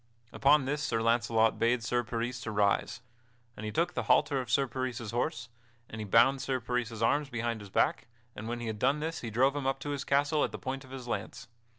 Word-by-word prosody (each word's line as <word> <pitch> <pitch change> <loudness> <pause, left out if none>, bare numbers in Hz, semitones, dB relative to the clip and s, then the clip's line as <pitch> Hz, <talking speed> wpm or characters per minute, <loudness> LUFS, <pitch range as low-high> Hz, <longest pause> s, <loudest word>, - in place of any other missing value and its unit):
Upon 140 0 +4
this 145 +2 -1
Sir 115 -6 0
Launcelot 115 -1 +2
bade 120 0 +2
Sir 120 +2 0
Peris 120 +1 -4
rise. 105 +1 +1 0.5
And 110 - -6
he - - -3
took 170 +9 0
the - - -1
halter 145 -3 +3
of 125 - -9
Sir 135 +4 +3
Peris's 125 -4 -4
horse, 115 -1 -2 0.4
and 110 - -7
he - - -4
bound 125 +6 +4
Sir 130 0 -1
Peris's 115 -1 -2
arms 145 +4 +2
behind 115 -3 -2
his 100 - -10
back, - - +1 0.3
and 110 - -7
when 120 +1 -3
he - - -4
had 110 -2 -4
done 135 +5 +2
this 160 +1 -3
he 115 - -4
drove 130 +5 +2
him 140 -2 -2
up 135 0 0
to 145 - -4
his 140 -1 -3
castle 145 +2 +2
at - - -1
the - - -6
point 135 +1 -5
of 130 - -15
his 130 -2 -8
lance. 120 - -4
120 Hz, 230 wpm, -30 LUFS, 115-135 Hz, 0.5 s, Upon